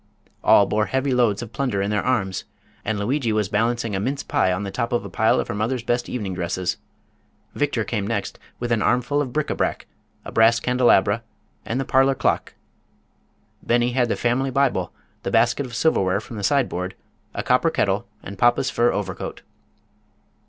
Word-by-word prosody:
All 100 - +6
bore 105 +2 0
heavy 130 0 0
loads 120 -3 +2
of 115 -2 -10
plunder 125 -7 -1
in 100 +1 0
their 105 - +1
arms, 100 -8 -1 0.4
and 110 0 -1
Lugui 120 +4 0
was 105 -2 0
balancing 115 0 0
a - - -1
mince 135 +7 -2
pie 95 - +1
on 90 +3 -1
the 100 - -4
top 115 - -2
of 120 - 0
a - - -8
pile 110 0 +3
of - - -2
her - - -3
mother's 115 +4 -1
best 120 0 -1
evening 105 -7 -3
dresses. 90 0 -2 0.8
Victor 145 -6 0
came 100 -1 -2
next 105 -3 -3 0.2
with 120 0 -4
an 115 -2 +2
armful 125 +7 +1
of 130 -4 -3
bric 150 +3 -1
a - - -1
brac, - - -1 0.4
a - - -7
brass 115 +1 +4
candelabra 125 -1 +3 0.5
and 125 - -1
the 135 - -1
parlor 135 +1 +3
clock. - - -1 1.1
Beni 120 +1 +2
had 125 -1 +1
the - - +1
family 125 +3 0
Bible, 125 -10 +1 0.3
the - - -3
basket 120 +6 +2
of 120 - -9
silverware 100 -10 +2
from 110 +2 -10
the 105 - -5
sideboard, 95 -7 0 0.4
a - - -2
copper - - +3
kettle - - 0 0.2
and 100 -1 -9
papa's 120 +2 +3
fur 120 +1 +2
overcoat. 95 -3 -4
115 Hz, 190 wpm, -23 LUFS, 100-125 Hz, 1.1 s, All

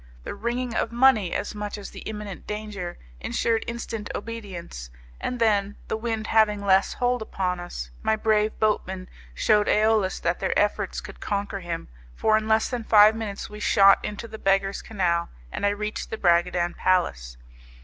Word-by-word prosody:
The - - -5
ringing 240 +1 -2
of 225 - -1
money, 235 -6 +4
as 205 - -2
much 210 0 -5
as 205 - -8
the - - -9
imminent 210 -3 -7
danger, 210 -4 -5 0.2
ensured 225 - 0
instant 230 -2 -5
obedience, 195 - -7 0.3
and 250 - -3
then, 205 -3 +2
the - - 0
wind 220 -1 -3
having 210 -2 +3
less 190 0 +4
hold 245 -1 0
upon 185 -4 -2
us, 60 - -7
my 220 - +2
brave 215 0 +1
boatmen 190 -3 0 0.3
shewed 210 - +3
AEolus 215 -3 +2
that 170 +1 0
their - - 0
efforts 205 0 0
could 195 -2 -11
conquer 200 -1 -2
him, 170 -2 -5 0.3
for 215 - +3
in 215 0 0
less 220 0 +3
than 245 -3 -3
five 215 0 +7
minutes 215 -3 -5
we 210 0 -10
shot 195 -1 +5
into 210 +2 -5
the 220 -1 -9
Beggars' 195 0 +1
Canal, 175 -5 0 0.2
and 205 - 0
I - - +4
reached 210 +1 -3
the 220 - -4
Bragadin 175 -1 +2
Palace. 60 - 0
210 Hz, 170 wpm, -25 LUFS, 190-220 Hz, 0.3 s, five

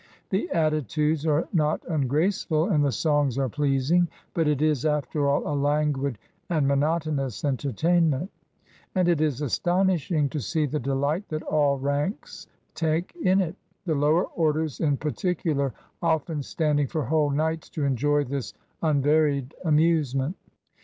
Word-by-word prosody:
The 190 +2 0
attitudes 155 - 0
are 150 +1 +2
not 155 -3 +1
ungraceful, 155 - +1
and 150 -7 +3
the 140 - +2
songs 145 +1 +1
are 135 -2 0
pleasing; 145 +6 +2 0.3
but 165 -2 +1
it 150 -2 +1
is, 155 -4 +1
after 150 -1 0
all, 140 - +1
a 150 - -1
languid 145 -3 0 0.3
and 155 -5 +1
monotonous 145 -3 0
entertainment; 150 - +1 0.6
and 185 -2 +2
it 170 -3 +2
is 150 -3 0
astonishing 175 0 +1
to 150 - -3
see 155 +5 0
the 150 +2 -2
delight 140 - -1
that 155 0 -3
all 145 -2 +2
ranks 145 - -3 0.3
take 165 +1 -1
in 190 -6 +3
it; 175 -1 -3 0.3
the 165 - 0
lower 150 +4 +3
orders, 155 -3 -1
in 145 -4 +1
particular, 155 -3 -1 0.3
often 160 -2 0
standing 145 0 0
for 155 +3 -2
whole 150 +3 +2
nights 160 +3 -1
to 150 - -4
enjoy 145 +2 +2
this 140 -1 -5 0.3
unvaried 145 -2 +2
amusement. 155 -2 +2
150 Hz, 140 wpm, -25 LUFS, 140-160 Hz, 0.6 s, and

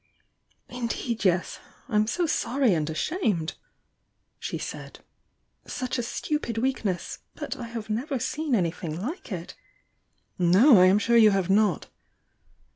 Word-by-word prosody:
"Indeed, 235 -2 -3
yes! 185 -1 +1 0.3
I'm 215 -3 +2
so 350 +9 0
sorry 270 - +1
and 155 -2 -1
ashamed!" 180 - -1 0.9
she - - -4
said. - - -8 0.7
"Such 255 0 -3
a - - +1
stupid 240 0 -3
weakness! 225 -7 -2 0.2
But - - -5
I 240 - -6
have 230 -2 -6
never 255 +6 -2
seen 295 +3 -1
anything 170 -3 -2
like 290 - -6
it - - -6 0.5
" - - -44
"No, 190 - +6
I'm 185 +2 +6
bure 235 +3 +3
you 220 -2 +8
have 195 -2 +1
not!" 205 -2 +2
225 Hz, 130 wpm, -26 LUFS, 185-255 Hz, 0.9 s, you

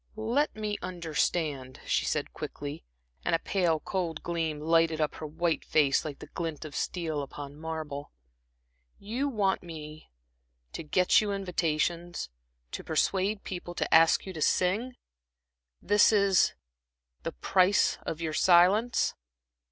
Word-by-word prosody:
"Let 235 +7 0
me 210 -1 -3
understand," 160 -6 -2
she - - +1
said, - - -2
quickly, 145 - -6 0.4
and - - +2
a 165 - -4
pale, 175 -5 +1
cold 170 -2 -3
gleam 165 -3 -2
lighted 165 +1 +2
up 150 -1 0
her 155 - -4
white 165 +2 -1
face, 145 -3 +3
like 145 -3 -6
the - - -10
glint 165 -3 -4
of 150 - -8
steel 160 -5 -2
upon 140 0 -8
marble. 155 -3 -5 0.9
"You 245 +8 -2
want 205 -6 +1
me 155 -2 -9 0.6
to - - -6
to 155 - -14
get 180 +5 +4
you 210 -1 -2
invitations, 175 - -1 0.4
to - - -5
persuade 195 +6 0
people 175 -1 -6
to - - -1
ask 165 0 +6
you 190 - -6
to 160 - -7
sing? 210 +11 +1 0.9
This 205 +2 +5
is 200 -3 +4 0.7
the - - -3
the - - -15
price 185 - +3
of 160 - -5
your 160 -1 -2
silence?" 190 +9 +4
170 Hz, 145 wpm, -29 LUFS, 155-195 Hz, 0.9 s, ask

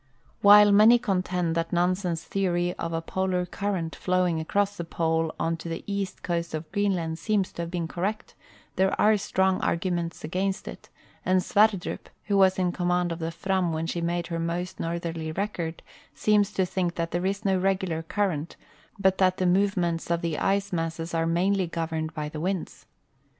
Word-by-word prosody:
While 205 0 +8
many 215 +4 +7
contend 180 -6 -1
that 165 0 -1
Nansen's 180 -1 0
theory 175 -2 0
of 165 - -3
a 165 0 -2
Polar 185 0 -1
current 180 -3 -3
flowing 180 -3 +1
across 200 +5 0
the 170 - -4
Pole 165 -1 0
on 165 0 0
to 165 +1 -7
the 165 - -5
east 200 -1 -4
coast 170 -2 -2
of 155 +1 -6
Greenland 180 -5 0
seems 205 -2 0
to - - -6
have 170 - -4
been 170 -2 -2
correct, 195 +6 -3 0.4
there 190 0 +2
are 215 +1 +5
strong 190 -2 +1
arguments 170 -1 -1
against 190 +5 -2
it, - - -9 0.3
and 185 0 +2
Sverdrup, 205 -3 +1
who 205 - -1
was 190 -1 +5
in 180 -1 +1
command 180 0 0
of 165 - -4
the 165 0 -2
Fram 185 0 -1
when 160 +1 -2
she 170 +1 -3
made 170 0 -1
her 170 -1 -4
most 175 +2 -3
northerly 165 -1 -3
record, 175 -4 -3 0.3
seems 210 -1 +2
to 190 - +1
tliink 180 -1 -1
that 165 0 -2
there 175 +2 0
is 200 +2 -3
no 195 -1 +3
regular 185 -3 0
current, 165 -3 -2 0.5
hut 190 0 +3
that 185 -1 +3
the 185 - 0
movements 180 -3 +1
of 170 0 +1
the 165 -3 -2
ice 200 0 0
masses 165 0 -3
are 165 0 +1
mainly 185 +2 +1
governed 160 -1 -3
by 150 -2 -3
the 150 0 -6
winds. 185 0 -3
180 Hz, 180 wpm, -26 LUFS, 165-195 Hz, 0.5 s, While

